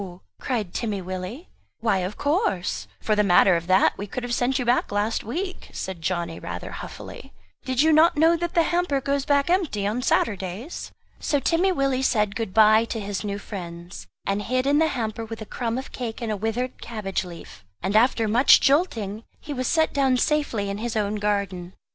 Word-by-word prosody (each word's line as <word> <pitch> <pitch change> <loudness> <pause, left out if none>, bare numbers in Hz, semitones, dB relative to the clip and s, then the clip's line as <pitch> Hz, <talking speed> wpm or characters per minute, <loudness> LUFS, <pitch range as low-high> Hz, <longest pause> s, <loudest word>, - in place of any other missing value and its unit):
cried 220 -8 -2
Timmy 215 -4 -2
Willie. 185 - -6 0.3
"Why 220 -4 +1
of 185 +3 -4
course 190 - 0
for 215 - +1
the 210 - +3
matter 185 -1 +5
of 170 0 -3
that 185 +1 +4
we 205 - -4
could 245 +5 -5
have 245 0 -3
sent 250 +2 +1
you 250 - -2
back 240 -2 +2
last 205 +2 0
week," 360 - -5
said 185 -3 -5
Johnny 170 -1 -2
rather - - -6
huffily - - -9 0.3
"did 260 +1 +2
you 315 0 +4
not 325 +2 +5
know 325 +2 +5
that 345 +2 -3
the 335 - +5
hamper 345 -5 +1
goes 280 0 -1
back 280 -1 +2
empty 320 - +1
on 215 +5 -1
Saturdays?" 205 - -1 0.3
So 290 - +1
Timmy 345 +7 +2
Willie 275 -5 +1
said 210 -6 +1
good 220 -2 -3
bye 220 +2 +6
to 230 - -4
his 200 -1 -4
new 200 -1 -3
friends, 175 -3 -8 0.2
and 200 +1 0
hid 255 +5 0
in 285 +2 +3
the 320 - +4
hamper 230 -5 -3
with 225 0 -7
a 215 - -6
crumb 230 +2 -3
of 265 - -6
cake 235 -3 -5
and 230 -3 -3
a - - 0
withered 225 +5 -3
cabbage 210 -5 -3
leaf; 170 - -11 0.2
and 195 +3 -1
after 230 0 +4
much 235 +6 +6
jolting, 230 - +1 0.2
he 290 - -6
was 255 -2 -2
set 320 -1 +2
down 270 -2 +3
safely 270 -8 0
in 200 - -4
his 235 0 -3
own 210 0 0
garden. 200 -3 -2
225 Hz, 200 wpm, -24 LUFS, 200-275 Hz, 0.3 s, bye